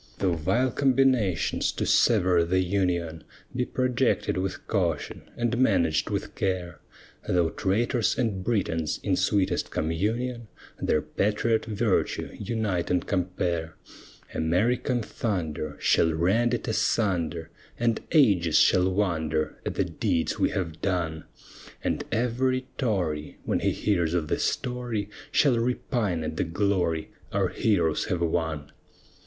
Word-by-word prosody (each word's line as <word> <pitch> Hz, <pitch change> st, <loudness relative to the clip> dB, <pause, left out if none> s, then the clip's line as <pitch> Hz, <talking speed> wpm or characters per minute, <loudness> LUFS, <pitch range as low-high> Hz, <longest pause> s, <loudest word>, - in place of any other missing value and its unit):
Though 95 Hz, -3 st, +1 dB
vile 95 Hz, +11 st, +1 dB
combinations 130 Hz, -, +2 dB
to -, -, -2 dB
sever 90 Hz, -2 st, +4 dB
the 95 Hz, +2 st, +1 dB
Union 85 Hz, -4 st, -1 dB, 0.3 s
Be 125 Hz, 0 st, 0 dB
projected 130 Hz, -1 st, +1 dB
with 95 Hz, +1 st, -3 dB
caution -, -, -2 dB
and 120 Hz, 0 st, 0 dB
managed 90 Hz, -11 st, +2 dB
with -, -, -3 dB
care, 90 Hz, -4 st, -2 dB, 0.5 s
Though 85 Hz, -2 st, +2 dB
traitors 115 Hz, +5 st, 0 dB
and 110 Hz, -7 st, -1 dB
Britons, 85 Hz, -8 st, -1 dB
in 95 Hz, -3 st, +1 dB
sweetest 95 Hz, -2 st, +1 dB
communion, 110 Hz, +9 st, -2 dB, 0.3 s
Their 75 Hz, -, +1 dB
patriot 105 Hz, +7 st, 0 dB
virtue 110 Hz, -2 st, 0 dB
unite 105 Hz, -7 st, -1 dB
and 90 Hz, -1 st, +1 dB
compare, 90 Hz, -3 st, -2 dB, 0.6 s
American 115 Hz, -, +1 dB
thunder 85 Hz, -10 st, -3 dB
Shall 80 Hz, -, +3 dB
rend 110 Hz, +9 st, +2 dB
it -, -, -6 dB
asunder, 85 Hz, -8 st, 0 dB, 0.3 s
And 115 Hz, -1 st, +1 dB
ages 100 Hz, -, +4 dB
shall 90 Hz, 0 st, +4 dB
wonder 80 Hz, -5 st, -1 dB
At -, -, -3 dB
the -, -, +1 dB
deeds 80 Hz, -, -1 dB
we -, -, +3 dB
have 85 Hz, -4 st, -4 dB
done: 85 Hz, -5 st, -1 dB, 0.6 s
And -, -, -1 dB
every 125 Hz, +3 st, 0 dB
Tory 90 Hz, -, -1 dB
When -, -, 0 dB
he -, -, +1 dB
hears 85 Hz, -5 st, 0 dB
of 80 Hz, -3 st, -1 dB
the -, -, 0 dB
story, 120 Hz, -5 st, -2 dB, 0.2 s
Shall 130 Hz, -5 st, +3 dB
repine 115 Hz, -, -1 dB
at 80 Hz, 0 st, -4 dB
the -, -, +1 dB
glory 85 Hz, -2 st, 0 dB, 0.2 s
Our -, -, +1 dB
heroes 85 Hz, -8 st, +1 dB
have 90 Hz, -5 st, -2 dB
won. 80 Hz, -3 st, -1 dB
95 Hz, 125 wpm, -26 LUFS, 85-115 Hz, 0.6 s, sever